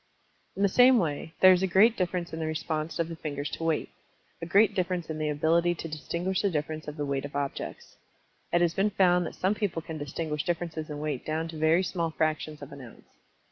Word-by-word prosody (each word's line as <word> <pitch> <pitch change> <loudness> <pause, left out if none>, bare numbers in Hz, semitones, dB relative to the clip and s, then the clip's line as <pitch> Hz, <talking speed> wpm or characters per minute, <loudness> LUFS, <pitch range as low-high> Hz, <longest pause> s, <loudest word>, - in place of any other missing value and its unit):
In 195 - -1
the - - +6
same 250 +5 +6
way, 160 -4 -2
there 185 - +9
is 180 - +1
a 190 - +2
great 205 +6 +5
difference 180 -3 -2
in 160 - -4
the 160 - -2
response 155 0 -3
of 170 - 0
the 165 - -6
fingers 145 -2 -4
to - - -5
weight 165 -2 0 0.5
a 165 - -4
great 205 +3 +4
difference 180 -3 -2
in 155 - -5
the 155 0 0
ability 165 +4 +2
to 165 - -6
distinguish 170 +4 -2
the 200 - +2
difference 155 -1 -3
of 150 +1 -6
the 145 - -2
weight 140 -1 -2
of 145 0 -7
objects. 140 -1 -5 0.5
It 175 - +3
has 170 -1 +2
been 195 +3 +2
found 180 -3 +3
that - - -8
some 190 +2 +1
people 200 -7 -2
can 160 -2 -6
distinguish 150 +1 -3
differences 165 -2 -3
in 150 - -5
weight 150 -4 -3
down 160 +1 -2
to 165 - -8
very 160 +3 +3
small 170 -2 -1
fractions 155 -1 -2
of 140 - -10
an 140 -1 -9
ounce. 120 -3 -13
165 Hz, 230 wpm, -28 LUFS, 155-180 Hz, 0.5 s, there